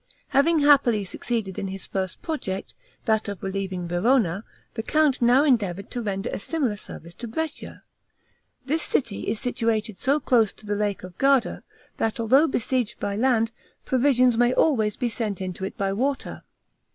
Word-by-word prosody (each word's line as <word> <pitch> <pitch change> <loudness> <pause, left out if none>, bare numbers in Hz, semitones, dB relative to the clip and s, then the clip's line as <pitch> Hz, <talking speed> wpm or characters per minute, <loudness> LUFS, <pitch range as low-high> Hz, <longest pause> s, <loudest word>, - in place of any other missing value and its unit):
Having 315 +3 +3
happily 265 -7 +5
succeeded 200 -1 -3
in 195 - -3
his 190 0 -6
first 190 -2 -4
project, 195 - -4 0.3
that 220 -2 +1
of 200 -3 -7
relieving 190 -2 -3
Verona, 195 +1 +2 0.3
the 225 - -3
count 300 +2 +2
now 245 +4 +5
endeavored 200 - +1
to 245 - -3
render 200 0 -3
a - - -3
similar 265 -3 -1
service 170 -4 -10
to 235 +7 -7
Brescia. 315 +7 -5 0.8
This 310 +4 +1
city 230 -9 -1
is 215 0 -1
situated 225 -5 -1
so 280 +3 +2
close 230 -7 +2
to 215 - -16
the 205 - -1
Lake 205 -2 -1
of 180 -1 -11
Garda, 275 -2 +2 0.4
that 225 +1 -1
although 265 +8 +4
besieged 250 -3 -1
by 200 - -2
land, 230 -1 +2 0.3
provisions 255 -2 +3
may 245 +1 +3
always 220 -9 +2
be 250 - 0
sent 220 -4 -3
into 185 0 -4
it - - -7
by 195 -1 0
water. 265 +6 -2
225 Hz, 165 wpm, -25 LUFS, 200-260 Hz, 0.8 s, happily